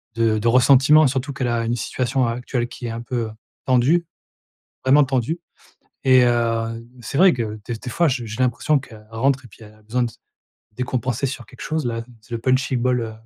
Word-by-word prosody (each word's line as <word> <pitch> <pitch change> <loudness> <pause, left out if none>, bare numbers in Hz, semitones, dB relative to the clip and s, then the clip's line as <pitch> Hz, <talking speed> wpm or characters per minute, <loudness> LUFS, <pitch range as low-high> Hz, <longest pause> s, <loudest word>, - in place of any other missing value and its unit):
de 115 -2 +2
de 115 - -1
ressentiment 135 +5 +6
surtout 135 +2 -2
qu'elle 135 -2 -2
a 120 -1 0
une 120 +1 0
situation 125 +3 -1
a - - 0
actuelle 125 0 -3
qui 120 0 -7
est - - -4
un 115 +1 -5
peu, 120 -1 -3
heu, - - -10 0.3
tendue, 135 +7 +3 0.8
vraiment 140 +3 +6
tendue 135 +5 -1 0.6
et 130 -1 +6
heu, 115 -1 0 0.2
c'est 120 - -5
vrai 185 +3 +6
que 110 -3 -4
des 120 - -4
des 120 +3 -7
fois 170 +6 +2
j 125 -4 -2
j'ai 110 +4 -3
l'impression 130 +4 +1
qu'elle 110 -5 -14
rentre 130 +4 +1
et - - -12
puis 110 - -17
elle 105 -1 -13
a 110 - -23
besoin 115 +4 -1
de 120 -2 -2 0.6
décompenser 125 +1 -1
sur 125 -2 -5
quelque 125 - -13
chose. 155 -3 -2
Là, 115 -1 -3 0.2
c'est 110 - -17
le - - -2
punching 130 0 +1
ball, 125 0 +1
heu, 110 -1 -5
125 Hz, 215 wpm, -21 LUFS, 115-130 Hz, 0.8 s, ressentiment